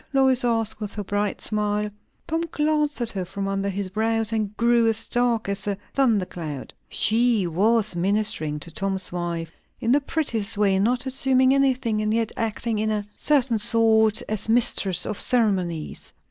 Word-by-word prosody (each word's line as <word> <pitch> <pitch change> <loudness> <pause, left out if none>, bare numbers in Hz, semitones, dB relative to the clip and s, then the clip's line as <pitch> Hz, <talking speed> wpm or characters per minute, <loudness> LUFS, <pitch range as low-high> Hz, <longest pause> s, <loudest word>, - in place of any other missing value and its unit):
Lois 265 -2 +3
asked, 225 -3 +1
with 210 -1 -6
her 205 - -4
bright 205 +1 -2
smile. 210 0 0 0.4
Tom 325 0 -1
glanced 300 -1 0
at 235 -1 +3
her 190 -2 -3
from 195 +2 -5
under 195 0 -2
his 195 0 -4
brows, 225 +2 -1
and 210 -2 -2
grew 235 0 +3
as 225 0 -1
dark 240 -3 0
as 200 0 -3
a 200 -1 -1 0.2
thundercloud. 180 - -1 0.2
She 225 -2 +2
was 210 +4 +3
ministering 175 -5 -1
to 170 - -8
Tom's 190 +1 -2
wife 170 -2 -4 0.3
in 235 -2 0
the 285 +3 +4
prettiest 240 -9 -1
way; 195 -2 +2
not 245 +5 0
assuming 260 0 +2
anything, 260 -5 +1
and 215 0 -1
yet 225 0 0
acting 225 -1 -2
in 215 0 0
a 210 -1 -2
certain 260 -6 +1
sort 220 0 +3
as 215 0 -2
mistress 200 -6 +2
of 215 - -4
ceremonies. 190 - -1
215 Hz, 165 wpm, -23 LUFS, 195-240 Hz, 0.4 s, the